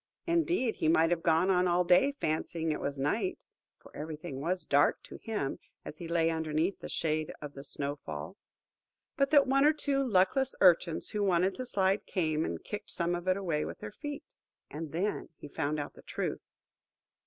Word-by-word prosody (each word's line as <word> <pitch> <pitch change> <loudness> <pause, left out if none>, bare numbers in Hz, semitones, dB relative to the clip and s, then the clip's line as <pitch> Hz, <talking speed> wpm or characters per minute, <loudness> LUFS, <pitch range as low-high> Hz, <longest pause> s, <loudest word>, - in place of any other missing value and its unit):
Indeed, 335 -7 +1
he - - 0
might 165 +1 +4
have 170 -1 +1
gone 165 +4 +3
on 180 0 +3
all 175 +1 +3
day, 185 +11 +4
fancying 160 - -2
it 150 - -2
was 140 0 -2
night 205 - 0 0.4
(for - - -17
everything 150 -2 -6
was 180 +4 -1
dark - - +3
to - - -10
him, 210 - -3 0.3
as - - -8
he 170 - -6
lay 165 -1 +2
underneath 160 +3 0
in - - -33
the - - -7
shade 155 -1 -1
of 145 -1 -7
the 140 - -9
snow 140 +1 -4
fall), 75 - -7 0.8
but 275 0 +2
that 285 -2 +6
one 275 +1 +3
or 300 +1 +6
two 285 -2 -1
luckless 240 +4 +2
urchins, 175 -2 +4
who 210 - -2
wanted 185 0 +3
to 255 - -5
slide, 195 -1 +1
came 160 -4 0
and 85 - -4
kicked 210 0 -6
some 170 0 0
of 175 +1 -4
it 185 0 +3
away 170 -6 -1
with - - -6
their - - -7
feet. 290 +5 -6 0.5
And 155 0 -6
then 190 +6 -2
he - - -9
found 145 +1 -2
out 145 - -5
the - - -15
truth. - - -3
175 Hz, 200 wpm, -31 LUFS, 155-210 Hz, 0.8 s, that